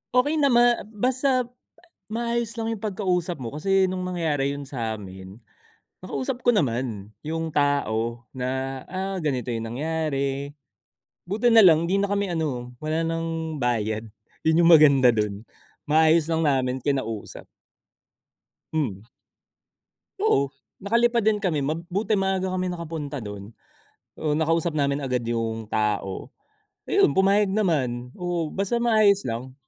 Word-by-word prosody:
Okey 290 Hz, +5 st, +3 dB
naman 240 Hz, -6 st, +4 dB
basta 255 Hz, +3 st, +1 dB, 0.7 s
maayos 235 Hz, 0 st, -1 dB
lang 225 Hz, -, -2 dB
yung 210 Hz, -, -11 dB
pagkausap 180 Hz, -5 st, -1 dB
mo. 120 Hz, +2 st, -6 dB
Kasi 195 Hz, +4 st, +2 dB
nung 185 Hz, 0 st, -3 dB
nangyari 160 Hz, -6 st, -1 dB
yun 140 Hz, -1 st, -7 dB
sa'min, 105 Hz, -5 st, -6 dB, 0.6 s
nakausap 140 Hz, -, -4 dB
ko -, -, -4 dB
naman 115 Hz, -, -1 dB
yung 160 Hz, +1 st, -4 dB
tao 120 Hz, -5 st, 0 dB
na, 130 Hz, +1 st, -3 dB
ah, 190 Hz, 0 st, -3 dB
ganito 130 Hz, -6 st, -2 dB
yung 115 Hz, -1 st, -3 dB
nangyari. 140 Hz, 0 st, -2 dB, 0.8 s
Buti 220 Hz, +4 st, +2 dB
nalang 175 Hz, -8 st, +7 dB
'di 195 Hz, +3 st, +1 dB
na 200 Hz, -, 0 dB
kami 200 Hz, -2 st, 0 dB
ano, 125 Hz, -7 st, -3 dB
wala 155 Hz, +2 st, -1 dB
ng 165 Hz, -1 st, -3 dB
bayad. 110 Hz, -2 st, -1 dB, 0.3 s
Yun 160 Hz, +2 st, +3 dB
yung 170 Hz, -, +7 dB
maganda 140 Hz, -6 st, +6 dB
dun. 105 Hz, 0 st, -2 dB, 0.4 s
Maayos 160 Hz, +1 st, +4 dB
lang 165 Hz, 0 st, 0 dB
namin 130 Hz, -4 st, +1 dB
kinausap. 120 Hz, -6 st, -3 dB, 1.3 s
Hmm. 115 Hz, -10 st, -2 dB, 1.1 s
Oo, 140 Hz, 0 st, +3 dB, 0.3 s
nakalipad 235 Hz, +3 st, +2 dB
din 215 Hz, 0 st, +3 dB
kami. 180 Hz, -8 st, -1 dB
Mabuti 175 Hz, +9 st, -1 dB
maaga 190 Hz, -1 st, 0 dB
kami 185 Hz, 0 st, -1 dB
nakapunta 155 Hz, -5 st, -5 dB
dun. 105 Hz, 0 st, -8 dB, 0.7 s
Oh, 150 Hz, -2 st, 0 dB
nakausap 165 Hz, +2 st, +1 dB
namin 140 Hz, 0 st, +1 dB
agad 125 Hz, -2 st, -1 dB
yung 115 Hz, -1 st, -2 dB
tao. 105 Hz, -3 st, -1 dB, 0.6 s
Ayun, -, -, +4 dB
pumayag 200 Hz, +2 st, +4 dB
naman. 130 Hz, -, 0 dB
Oo, 175 Hz, -2 st, -2 dB
basta 195 Hz, +4 st, -1 dB
maayos 215 Hz, -4 st, +4 dB
lang. 120 Hz, +3 st, -4 dB
155 Hz, 125 wpm, -24 LUFS, 125-190 Hz, 1.3 s, nalang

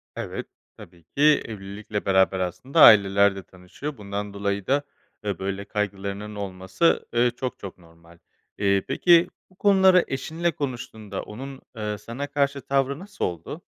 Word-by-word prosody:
Evet, -, -, -5 dB, 0.3 s
tabii 85 Hz, -2 st, -15 dB
ki 140 Hz, -, -6 dB, 0.2 s
evlilikle 105 Hz, 0 st, -6 dB
beraber 95 Hz, 0 st, +3 dB
aslında 95 Hz, -, 0 dB
aileler 100 Hz, -1 st, +7 dB
de 95 Hz, -, -7 dB
tanışıyor. 95 Hz, +11 st, -9 dB
Bundan 100 Hz, 0 st, -5 dB
dolayı 100 Hz, -1 st, -2 dB
da, 140 Hz, +2 st, +2 dB, 0.4 s
eee, 100 Hz, -4 st, -3 dB
böyle 100 Hz, +1 st, -3 dB
kaygılarının 100 Hz, 0 st, -4 dB
olması, 95 Hz, -, 0 dB
eee, 120 Hz, 0 st, +3 dB
çok 130 Hz, -1 st, -4 dB
çok 100 Hz, -, -8 dB
normal. 85 Hz, -1 st, -20 dB, 0.4 s
Eee, 100 Hz, -1 st, +2 dB
peki, 175 Hz, 0 st, +5 dB, 0.2 s
bu 185 Hz, -, -25 dB
konuları 190 Hz, -2 st, +5 dB
eşinle 160 Hz, +5 st, -2 dB
konuştuğunda 115 Hz, -, -5 dB
onun, 135 Hz, +5 st, -9 dB
eee, 105 Hz, -1 st, -3 dB
sana 115 Hz, +7 st, -6 dB
karşı 140 Hz, -1 st, 0 dB
tavrı 135 Hz, +2 st, 0 dB
nasıl 195 Hz, +2 st, -4 dB
oldu? 90 Hz, -, -6 dB
105 Hz, 145 wpm, -24 LUFS, 95-140 Hz, 0.4 s, aileler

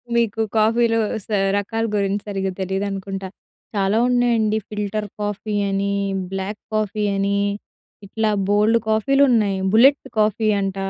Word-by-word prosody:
మీకు 225 Hz, -2 st, +1 dB
కాఫీలో 225 Hz, +1 st, +3 dB, 0.3 s
స -, -, -32 dB, 0.3 s
రకాల 225 Hz, +3 st, -2 dB
గురించి 200 Hz, 0 st, 0 dB
సరిగ్గా 195 Hz, -2 st, -2 dB
తెలీదనుకుంటా. 195 Hz, 0 st, -3 dB, 0.5 s
చాలా 200 Hz, +1 st, +1 dB
ఉన్నాయండి. 230 Hz, -3 st, +2 dB
ఫిల్టర్ 210 Hz, 0 st, -3 dB
కాఫీ 205 Hz, +1 st, -3 dB
అని, 200 Hz, 0 st, -1 dB, 0.4 s
బ్లాక్ 195 Hz, +2 st, -4 dB
కాఫీ 215 Hz, 0 st, -1 dB
అని, 200 Hz, +1 st, 0 dB, 0.7 s
ఇట్లా 220 Hz, +1 st, 0 dB, 0.2 s
బోలెడు 210 Hz, +3 st, +3 dB
కాఫీలు 275 Hz, +6 st, +3 dB
ఉన్నాయి. 205 Hz, -4 st, +2 dB
బుల్లెట్ 265 Hz, +7 st, +5 dB, 0.2 s
కాఫీ 215 Hz, +1 st, +2 dB
అంట. 195 Hz, -1 st, -2 dB
210 Hz, 120 wpm, -21 LUFS, 195-220 Hz, 0.7 s, బుల్లెట్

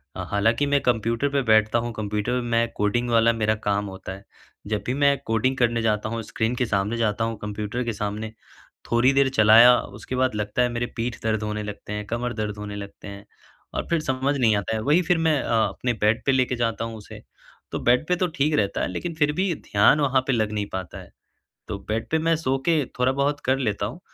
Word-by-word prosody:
अ, -, -, -4 dB
हालाँकि 110 Hz, +7 st, +2 dB
मैं 140 Hz, 0 st, +2 dB
कंप्यूटर 115 Hz, +3 st, 0 dB
पे 140 Hz, 0 st, +1 dB
बैठता 110 Hz, -1 st, +3 dB
हूँ, 120 Hz, +1 st, -3 dB
कंप्यूटर 105 Hz, +4 st, -2 dB
मैं 115 Hz, -1 st, +1 dB
कोडिंग 120 Hz, +4 st, 0 dB
वाला 115 Hz, 0 st, +4 dB
मेरा 110 Hz, -1 st, +1 dB
काम 100 Hz, 0 st, +1 dB
होता 95 Hz, 0 st, -7 dB
है। 100 Hz, +1 st, -12 dB, 0.4 s
जब 105 Hz, -1 st, -2 dB
भी 125 Hz, -, -1 dB
मैं 140 Hz, 0 st, +3 dB
कोडिंग 115 Hz, +4 st, 0 dB
करने 120 Hz, -1 st, +1 dB
जाता 110 Hz, -1 st, 0 dB
हूँ, 115 Hz, 0 st, -3 dB
स्क्रीन 110 Hz, +3 st, -2 dB
के 125 Hz, -, 0 dB
सामने 105 Hz, +1 st, -1 dB
जाता 115 Hz, -1 st, 0 dB
हूँ 115 Hz, -1 st, -2 dB
कंप्यूटर 105 Hz, +3 st, -3 dB
के 115 Hz, -1 st, -2 dB
सामने, 105 Hz, +2 st, -4 dB, 0.6 s
थोड़ी 120 Hz, +3 st, +4 dB
देर 135 Hz, 0 st, +3 dB
चलाया 115 Hz, +3 st, +8 dB, 0.2 s
उसके 130 Hz, -, -5 dB
बाद 130 Hz, -3 st, +1 dB
लगता 105 Hz, +3 st, -1 dB
है 125 Hz, -, +2 dB
मेरे 120 Hz, 0 st, -2 dB
पीठ 120 Hz, +1 st, -3 dB
दर्द 110 Hz, -1 st, 0 dB
होने 105 Hz, 0 st, -3 dB
लगते 105 Hz, 0 st, -7 dB
हैं, 105 Hz, 0 st, -4 dB
कमर 120 Hz, +1 st, -2 dB
दर्द 105 Hz, -1 st, -4 dB
होने 105 Hz, 0 st, -6 dB
लगते 100 Hz, 0 st, -9 dB
हैं 100 Hz, 0 st, -9 dB, 0.5 s
और -, -, -3 dB
फिर 170 Hz, -1 st, +2 dB
समझ 135 Hz, 0 st, -1 dB
नहीं 115 Hz, -5 st, +3 dB
आता 100 Hz, +2 st, -2 dB
है। 110 Hz, -, -2 dB
वही 150 Hz, +7 st, +4 dB
फिर 175 Hz, 0 st, +1 dB
मैं 160 Hz, -3 st, +2 dB
अ, -, -, -2 dB, 0.2 s
अपने 125 Hz, -1 st, -2 dB
बेड 110 Hz, +1 st, +1 dB
पे 135 Hz, -, +3 dB
लेके 130 Hz, -1 st, +1 dB
जाता 115 Hz, -2 st, -1 dB
हूँ 115 Hz, -1 st, -7 dB
उसे, 105 Hz, -, -11 dB, 0.5 s
तो -, -, -3 dB
बेड 125 Hz, +5 st, +2 dB
पे 180 Hz, -, +2 dB
तो 180 Hz, 0 st, 0 dB
ठीक 150 Hz, +3 st, +1 dB
रहता 100 Hz, -2 st, 0 dB
है -, -, 0 dB
लेकिन 170 Hz, -, -4 dB
फिर 150 Hz, -1 st, +2 dB
भी 185 Hz, +1 st, 0 dB, 0.2 s
ध्यान 105 Hz, +9 st, +5 dB
वहाँ 135 Hz, -2 st, +2 dB
पे 135 Hz, -, +2 dB
लग 110 Hz, -2 st, 0 dB
नहीं 105 Hz, -1 st, -2 dB
पाता 95 Hz, -3 st, -5 dB
है। -, -, -15 dB, 0.6 s
तो 100 Hz, -, -4 dB
बेड 110 Hz, +1 st, -2 dB
पे 160 Hz, -, +2 dB
मैं 165 Hz, 0 st, +3 dB
सो 135 Hz, -4 st, 0 dB
के 160 Hz, -5 st, +3 dB
थोड़ा 125 Hz, +1 st, +3 dB
बहुत 145 Hz, +2 st, 0 dB
कर 130 Hz, +1 st, +2 dB
लेता 105 Hz, -5 st, -1 dB
हूँ 125 Hz, +11 st, -8 dB
115 Hz, 230 wpm, -24 LUFS, 105-130 Hz, 0.6 s, चलाया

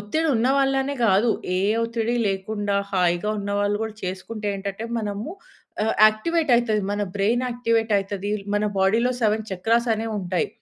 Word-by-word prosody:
ఒత్తిడి 310 Hz, +11 st, -1 dB
ఉన్న 230 Hz, +3 st, +1 dB
వాళ్ళనే 270 Hz, +1 st, +1 dB
గాదు. 215 Hz, +3 st, +4 dB, 0.3 s
ఏ -, -, 0 dB, 0.2 s
ఒత్తిడి 230 Hz, +1 st, -1 dB
లేకుండా 200 Hz, +1 st, -2 dB, 0.2 s
హాయిగా 180 Hz, +2 st, +1 dB
ఉన్నవాళ్లు 205 Hz, +1 st, 0 dB
గూడా 220 Hz, -1 st, -4 dB
చేసుకుంటే 205 Hz, +4 st, -5 dB
ఏంటటే 200 Hz, +3 st, -5 dB
మనము 210 Hz, +4 st, -4 dB, 0.6 s
ఆహ్, 220 Hz, -, +1 dB
యాక్టివేట్ 310 Hz, +8 st, -1 dB
అయితది 220 Hz, -3 st, 0 dB
మన 205 Hz, -, -2 dB, 0.2 s
బ్రెయిన్ 230 Hz, +6 st, +1 dB
యాక్టివేట్ 230 Hz, -2 st, 0 dB
అయితది. 200 Hz, +1 st, -3 dB, 0.2 s
మన 205 Hz, -, +1 dB
బాడీలో 225 Hz, +6 st, +3 dB
7 215 Hz, 0 st, +1 dB
చక్రాస్ 230 Hz, +6 st, +1 dB
అనేవుంటాయి. 205 Hz, -5 st, -2 dB
215 Hz, 140 wpm, -23 LUFS, 200-230 Hz, 0.6 s, గాదు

